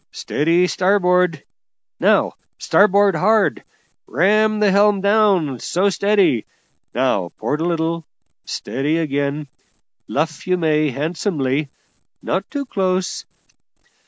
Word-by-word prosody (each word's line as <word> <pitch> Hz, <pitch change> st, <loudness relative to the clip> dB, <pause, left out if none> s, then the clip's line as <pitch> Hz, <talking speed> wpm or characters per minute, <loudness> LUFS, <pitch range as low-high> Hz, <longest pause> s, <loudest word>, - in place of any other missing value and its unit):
Steady 170 Hz, +4 st, +1 dB
starboard! 180 Hz, -3 st, +1 dB, 0.6 s
now -, -, +2 dB, 0.2 s
starboard 200 Hz, -1 st, +3 dB
hard! 210 Hz, +5 st, +2 dB, 0.4 s
ram 215 Hz, -, +2 dB
the 210 Hz, -2 st, +3 dB
helm 200 Hz, +1 st, +3 dB
down! 195 Hz, -, +2 dB
so, 185 Hz, +10 st, 0 dB
steady! 195 Hz, -, +1 dB, 0.5 s
Now 110 Hz, -8 st, 0 dB
port 145 Hz, +8 st, -2 dB
a -, -, 0 dB
little! 165 Hz, -1 st, -1 dB, 0.4 s
steady 145 Hz, +5 st, -2 dB
again! 145 Hz, -1 st, -2 dB, 0.6 s
luff 155 Hz, +4 st, -3 dB
you 180 Hz, 0 st, +2 dB
may, 155 Hz, -3 st, +1 dB
handsomely; 145 Hz, -, -2 dB, 0.5 s
not -, -, -3 dB
too 285 Hz, -1 st, -4 dB
close! 185 Hz, -5 st, -2 dB
175 Hz, 100 wpm, -19 LUFS, 150-200 Hz, 0.6 s, starboard